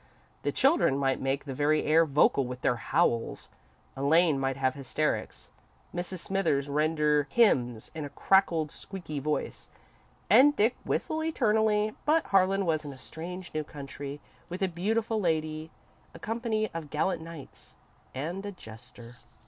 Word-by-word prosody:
The - - -1
children 275 - +3
might 135 -1 0
make 135 +2 -1
the 135 - -5
very 150 +3 +2
air 160 +2 +4
vocal 140 -1 +3
with 125 0 -7
their 120 - +1
howls, 115 0 0 0.5
Elaine 150 +2 +3
might 135 0 -1
have 130 -1 +1
hysterics, 145 +2 -3 0.4
Mrs. 175 0 -5
Smithers 150 -8 0
render 150 0 +1
hymns 125 - +2
in 160 -1 -5
a 145 - -5
cracked, 165 -1 +2
squeaky 175 -6 -7
voice, 150 +2 -3 0.6
and 265 +9 +6
Dick 225 +4 +2
whistle 315 0 -1
eternally, 215 -7 +2
but 315 +2 +3
Harlan 195 0 +3
was 160 -2 0
in 145 - -6
a 135 - -11
strange 175 +7 -8
new 155 0 -1
country, 140 -1 -8 0.3
with 180 +2 -4
a - - +3
beautiful 215 +5 -1
lady, 155 -2 -1 0.5
a - - -7
company 225 -1 -2
of 165 -3 -6
gallant 160 +4 0
knights, 165 -3 -12 0.4
and 170 +9 -4
a 205 - -5
jester. 120 - -13
160 Hz, 150 wpm, -29 LUFS, 140-195 Hz, 0.6 s, and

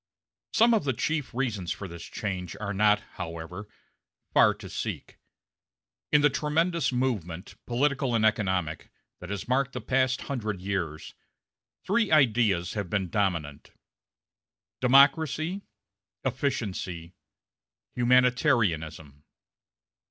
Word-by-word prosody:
Some 235 +1 +5
of 220 - +2
the 135 -2 0
chief 155 +4 -2
reasons 115 -8 -2
for 100 - -5
this 85 -1 -9
change 95 -5 -5
are 105 -1 -3
not, 105 +1 +3 0.2
however, 85 +5 -6 0.7
far - - +5
to - - -10
seek. - - -6 0.9
In 150 - +5
the 145 - +5
tremendous 165 +1 0
movement, 105 -9 -2
political 135 0 +1
and 110 -1 +3
economic, 95 -7 0 0.3
that 90 - -9
has 100 -1 -4
marked 135 +2 +1
the 125 - -3
past 130 +2 0
hundred 110 -8 -3
years, 90 -5 -4 0.7
three 215 +2 +1
ideas 115 - +3
have 100 -4 -3
been 95 -4 -1
dominant 85 -8 -2 1.1
democracy, 155 +7 +4 0.6
efficiency, 105 - -3 0.8
humanitarianism. 115 - +1
110 Hz, 105 wpm, -27 LUFS, 90-135 Hz, 1.1 s, Some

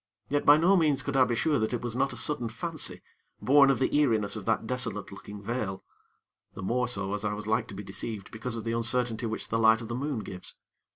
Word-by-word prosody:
Yet 145 0 -1
by 145 +1 +9
no 175 +5 +4
means 150 -6 +2
could 140 - -3
I 130 -1 +5
be 120 - -1
sure 150 +4 +1
that 110 +3 0
it 120 - -5
was 120 -1 -3
not 135 +2 +1
a - - -7
sudden 125 -6 0
fancy, 155 +7 -1 0.4
born 140 +1 +5
of 135 - +3
the 130 - 0
eeriness 110 -9 +2
of 105 -3 -6
that - - 0
desolate 115 -5 -1
looking 105 +1 -10
vale; 105 -4 -3 0.7
the 95 - -7
more 125 +5 0
so 100 -4 -3
as 105 0 -3
I 105 0 -1
was 105 0 -7
like 110 +2 0
to 100 - -9
be 100 - -6
deceived 100 +1 -6
because 115 +1 -3
of 115 - -5
the 115 - -2
uncertainty 115 0 +1
which 110 - -5
the 115 - 0
light 110 0 +5
of 115 - -8
the - - -3
moon 135 -2 -2
gives. 90 -3 -5
115 Hz, 245 wpm, -28 LUFS, 105-135 Hz, 0.7 s, by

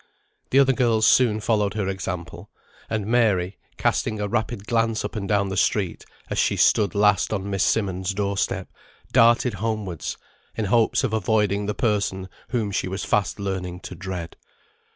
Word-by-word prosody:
The 135 - +2
other 135 -1 +5
girls 115 -4 +2
soon 110 -2 +4
followed 105 -2 +1
her 105 -3 -1
example, 90 -3 -5 0.4
and 110 -2 -2
Mary, 105 -5 +1 0.2
casting 110 -1 0
a 105 - -1
rapid 110 -1 -2
glance 115 -1 0
up 105 - -6
and 100 -3 -4
down 100 -1 +2
the 95 - -3
street, 95 -5 0 0.2
as - - -2
she - - +2
stood 100 -4 +3
last 105 -1 +3
on 100 -2 -2
Miss 100 -1 +1
Simmonds' 95 -2 0
door 100 0 -1
step, - - -1 0.4
darted 120 +2 +4
homewards, 105 -7 -3 0.4
in 110 - -1
hopes 115 +5 +2
of 125 -5 -1
avoiding 105 -1 +1
the 105 - -2
person 100 -5 -1 0.2
whom 115 -4 -1
she 95 - -1
was 95 +2 -4
fast 100 0 0
learning 95 -2 -4
to - - -8
dread. 90 -2 -6
105 Hz, 170 wpm, -24 LUFS, 95-110 Hz, 0.4 s, other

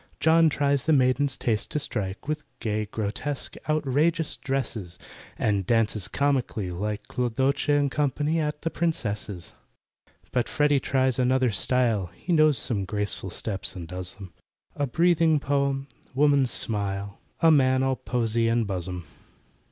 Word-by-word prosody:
JOHN 160 +1 +5
tries 140 -2 +1
the 160 - +4
maiden's 135 0 +2
taste 110 -3 0
to - - -2
strike 105 -7 -3
With 155 0 -2 0.2
gay, 105 -1 -2
grotesque, 110 +7 -4 0.2
outrageous 155 +2 +1
dresses, 115 -10 -3 0.4
And 100 -3 +1
dances 110 -2 +1
comically, 130 -9 0
like 105 +4 -4
CLODOCHE 130 +4 0
AND 145 -1 +3
CO., 145 -2 +1 0.3
at 150 -1 -2
the 165 - -1
Princess's. 105 - -3 0.8
But 125 -2 0
FREDDY 145 -1 +3
tries 130 -1 +1
another 130 -1 +3
style, 115 -4 +1
He 175 - -2
knows 155 -3 +5
some 105 -6 -1
graceful 100 0 -2
steps 95 +2 -3
and 85 -3 -7
does 90 +1 -6
'em— 95 -3 -11 0.4
A 145 - -1
breathing 165 +2 +3
Poem—Woman's 140 0 +1
smile— 100 -3 -3 0.2
A 165 -1 +6
man 130 -3 +4
all 135 0 +1
poesy 115 -1 0
and 115 0 +2
buzzem. 90 -3 -4
130 Hz, 135 wpm, -26 LUFS, 105-145 Hz, 0.8 s, A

